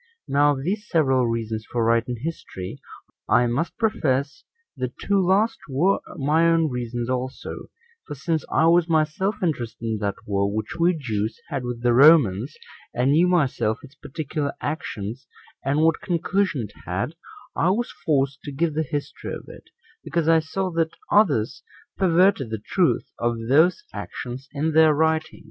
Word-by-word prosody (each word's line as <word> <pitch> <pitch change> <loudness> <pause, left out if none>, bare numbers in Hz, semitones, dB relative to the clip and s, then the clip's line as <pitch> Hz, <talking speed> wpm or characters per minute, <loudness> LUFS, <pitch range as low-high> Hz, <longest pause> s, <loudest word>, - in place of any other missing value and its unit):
Now 145 +1 +4
of 135 - -6
these 205 +6 -2
several 135 -7 +3
reasons 110 -1 -2
for 120 -2 0
writing 115 +1 +1
history, 125 - -6 0.5
I 120 - +5
must 125 +8 -2
profess 145 - 0 0.3
the 125 -1 -3
two 200 -1 +1
last 200 +5 +2
were 170 +9 +2 0.2
my 155 +3 +3
own 165 -3 +2
reasons 120 -1 -3
also; 130 0 -4 0.4
for 145 - -6
since 160 +2 -1
I 160 - +3
was 170 +1 +4
myself 160 +6 +1
interested 120 -9 -2
in 110 -2 -1
that 100 -1 -1
war 100 0 0
which 110 +9 -4
we 170 0 +3
Jews 110 -5 -3
had 135 -5 -3
with 120 -1 -5
the 120 -1 +4
Romans, 135 - +5 0.4
and 125 +3 +2
knew 165 +5 +4
myself 140 -10 +1
its 140 -1 -13
particular 145 -1 -4
actions, 130 -5 -5 0.4
and 140 +3 +1
what 165 0 +3
conclusion 175 - 0
it 105 - -9
had, 100 - -2 0.4
I 170 - +2
was 235 +6 0
forced 140 -3 +1
to 145 - -5
give 155 +3 0
the 155 - 0
history 145 -1 -4
of - - -10
it, - - -13 0.4
because 170 -2 -1
I 165 0 +6
saw 185 +4 -3
that 165 -1 -1 0.2
others 145 - +3 0.3
perverted 180 - +3
the 110 - -3
truth 175 - 0
of 120 0 0
those 160 - +4
actions 130 +2 -7
in 150 +2 -1
their 160 -1 +5
writings. 160 +1 0
145 Hz, 160 wpm, -24 LUFS, 120-165 Hz, 0.5 s, I